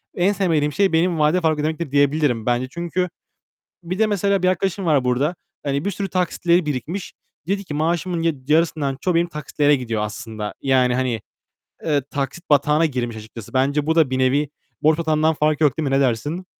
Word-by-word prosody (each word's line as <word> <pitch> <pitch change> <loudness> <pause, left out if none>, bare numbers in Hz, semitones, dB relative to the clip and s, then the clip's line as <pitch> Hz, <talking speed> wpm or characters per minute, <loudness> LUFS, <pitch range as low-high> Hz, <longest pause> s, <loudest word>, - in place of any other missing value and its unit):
en 185 +3 +2
sevmediğim 160 -7 +1
şey 195 -3 +2
benim 165 0 +2
vade 155 +4 +3
fark 155 -2 +1
ödemektir 155 0 -2
diyebilirim, 140 -5 +2
bence 125 +1 0
çünkü 175 +3 -2 0.7
bir 180 +3 -4
de 220 - +4
mesela 200 -1 +1
bir 185 - +3
arkadaşım 190 +1 -1
var 145 -5 +3
burada. 135 +7 +1 0.3
Hani 140 +2 -1
bir 200 - 0
sürü 195 0 -4
taksitleri 175 -1 +1
birikmiş. 150 +7 -4 0.4
Dedi 200 0 -1
ki 150 - -6
"Maaşımın 170 +3 -1
yad 150 -5 -2
yarısından 155 -3 +1
çoğu 180 +2 0
benim 170 +1 +2
taksitlere 150 -1 +1
gidiyor 115 -4 -3
aslında." 105 +1 -5
Yani, 130 -2 +3
hani, 125 -4 -1 0.7
eee, 145 -3 +2
taksit 140 +5 -4
batağına 150 +2 +4
girmiş 120 -6 -2
açıkçası. 110 +1 -10
Bence 140 +3 +1
bu 160 - +2
da 160 -5 +4
bir 130 - -1
nevi 135 +3 +2 0.3
borç 155 +1 +4
batağından 160 -1 +2
farkı 155 0 +1
yok 145 -5 +3
değil 155 -3 -1
mi? 135 - +1
Ne - - +3
dersin? 140 +8 -1
150 Hz, 190 wpm, -21 LUFS, 135-170 Hz, 0.7 s, de